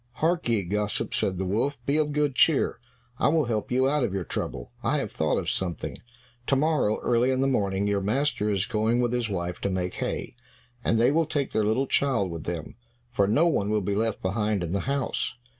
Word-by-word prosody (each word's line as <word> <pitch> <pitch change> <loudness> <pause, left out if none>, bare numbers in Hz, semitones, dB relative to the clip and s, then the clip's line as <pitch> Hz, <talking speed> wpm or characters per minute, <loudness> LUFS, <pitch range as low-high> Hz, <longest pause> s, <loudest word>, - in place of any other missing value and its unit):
"Hark 165 0 0
ye, 110 -4 +2
gossip," 105 +3 -1
said 95 - +1
the 95 - -2
wolf, 115 +10 0
"be 140 +2 +2
of 150 -1 +1
good 145 -1 +1
cheer, - - +3 0.4
I - - +3
will 155 -1 +3
help 110 -2 -2
you 130 +1 +3
out 145 0 +1
of 100 -5 -1
your 95 - -1
trouble. - - -5
I - - +1
have - - -3
thought - - 0
of - - -3
something. 90 -3 -2 0.5
To 135 - +3
morrow, 140 -7 +2
early 120 +1 +2
in 130 0 +1
the - - +3
morning, 100 -7 +1
your 100 -1 +1
master 105 0 0
is 100 -2 +1
going 110 +3 +1
with 120 -1 +1
his 120 -2 -1
wife 90 -2 -3
to 100 - 0
make 90 -1 -2
hay, - - -4 0.5
and 115 - +2
they 120 +3 +4
will 160 +1 +2
take 145 -3 -1
their 110 - +1
little 110 +6 +2
child 125 -9 +1
with 85 -2 -6
them, 85 +2 -5 0.3
for 100 -5 +2
no 145 +12 +4
one 105 -11 +1
will 105 0 +2
be 100 +1 -1
left 110 +1 -1
behind 105 0 0
in 85 - -3
the 100 - 0
house. 140 -1 -1
110 Hz, 225 wpm, -26 LUFS, 100-135 Hz, 0.5 s, they